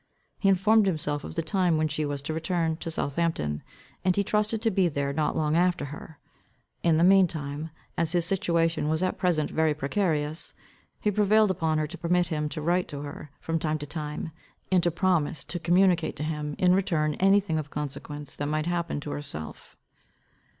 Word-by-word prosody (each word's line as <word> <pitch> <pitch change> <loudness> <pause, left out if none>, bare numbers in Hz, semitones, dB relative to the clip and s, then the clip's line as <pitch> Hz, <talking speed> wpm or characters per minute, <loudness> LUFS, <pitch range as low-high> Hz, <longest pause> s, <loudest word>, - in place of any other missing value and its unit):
He 195 - +3
informed 210 +2 +4
himself 150 -4 -1
of - - -8
the 165 - -1
time 180 -3 +2
when 155 0 +2
she 155 0 -1
was 145 -1 -3
to 155 - -3
return 165 0 0
to 165 - -5
Southampton, 140 - -1 0.4
and 185 -1 +2
he 200 - +2
trusted 210 +2 +1
to 225 - +3
be 190 -2 +3
there 140 -3 -1
not 150 +1 0
long 155 0 +1
after 175 -3 +2
her. 155 0 -10 0.6
In 165 -2 +3
the 165 - +3
mean 190 0 +6
time, 150 -1 -5 0.3
as 165 -1 +1
his 175 -2 +3
situation 170 -4 +1
was 160 +3 +1
at 185 - -1
present 165 -5 +1
very 160 -1 +2
precarious, 155 0 -1 0.4
he 210 - +1
prevailed 210 0 +4
upon 160 -3 0
her 155 - +1
to 175 +4 -8
permit 175 +1 +2
him 150 -2 -1
to 155 0 -5
write 175 +3 +1
to 145 -1 -6
her 145 +1 -8
from 165 0 -2
time 155 -1 0
to 145 - -6
time, 150 +1 -5 0.4
and 185 -2 +5
to 175 - +2
promise 170 -4 0
to 175 - -4
communicate 175 0 +3
to - - -4
him 150 -1 -3
in 180 -1 +4
return 165 -6 +1
any 195 +2 +5
thing 160 -6 -2
of 150 -1 -6
consequence 145 0 -6
that 145 - -3
might 155 +1 -1
happen 170 -3 -1
to 145 - -6
herself. 80 - -7
160 Hz, 200 wpm, -27 LUFS, 150-180 Hz, 0.6 s, mean